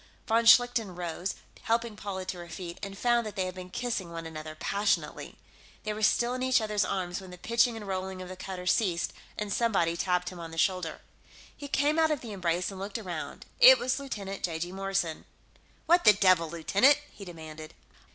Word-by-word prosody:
Von 230 +1 +2
Schlichten 230 -5 +5
rose, 175 +1 -4 0.3
helping 230 -1 0
Paula 195 -2 -5
to 185 -1 -5
her 170 0 -9
feet, 170 0 -7
and 195 0 -6
found 240 +1 +2
that 215 -2 -7
they 190 -2 0
had 185 - -4
been 185 0 -9
kissing 205 -5 -3
one 165 0 -6
another 155 -1 -7
passionately. 200 +5 -1 0.5
They 215 - -2
were 215 - -6
still 235 +3 +3
in 255 - -4
each 260 0 +3
other's 210 -2 0
arms 185 -1 -2
when 190 - -11
the 180 - -10
pitching 235 +5 +2
and 210 -2 -8
rolling 190 0 -3
of 185 - -7
the 185 - -7
cutter 185 -1 -7
ceased 180 -2 +1 0.2
and 210 -2 -2
somebody 195 -8 +1
tapped 180 0 0
him 180 - -10
on 165 -1 -7
the 165 - -10
shoulder. 180 -2 0 0.5
He 285 - -8
came 290 +3 +2
out 320 -1 +4
of 300 -4 -1
the 230 - -8
embrace 180 -1 -1
and 190 - -9
looked 200 +2 -4
around. 180 -8 -6
It - - +10
was 255 +2 -1
Lieutenant 200 -8 -6
(j.g.) 170 +1 -2
Morrison. 195 -4 -2 0.6
"What 345 +1 +4
the 210 - +8
devil, 185 -4 +3
lieutenant?" 200 - +4
he 205 - -11
demanded. 160 -3 -10
195 Hz, 200 wpm, -29 LUFS, 175-225 Hz, 0.6 s, It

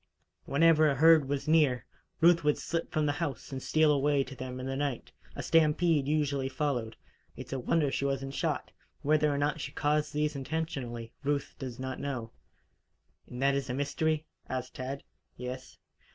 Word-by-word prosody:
Whenever 155 +1 +5
a 140 - +1
herd 155 -1 +6
was 140 +1 -2
near, 150 -6 +3 0.4
Ruth 170 0 +6
would 150 0 +3
slip 165 0 -3
from 155 -2 +1
the 145 - +2
house 145 -5 -4
and 135 -1 -4
steal 155 +2 +3
away 145 -1 +2
to 135 - -10
them 130 -1 -6
in 130 - -5
the 135 0 -2
night, 140 -3 -3 0.2
A - - -4
stampede 160 -2 +3
usually 145 -3 0
followed. 130 -5 -2 0.4
It's - - -7
a 135 - -1
wonder 145 +2 +1
she 140 - -1
wasn't 135 0 -2
shot. - - -2 0.3
Whether 150 0 +3
or 140 - -1
not 145 +2 0
she - - -5
caused 150 0 0
these 150 0 0
intentionally, 135 -6 -4
Ruth 140 0 -1
does 130 -4 -6
not 130 0 -4
know 125 -5 -4 0.5
" - - -44
"And 125 +2 -5
that 140 0 +4
is 140 -1 -1
the 125 - -2
mystery?" 155 +3 0 0.2
asked 130 -1 -4
Tad. 135 +2 -5 0.3
"Yes." 125 +1 -7
140 Hz, 180 wpm, -30 LUFS, 130-150 Hz, 0.5 s, herd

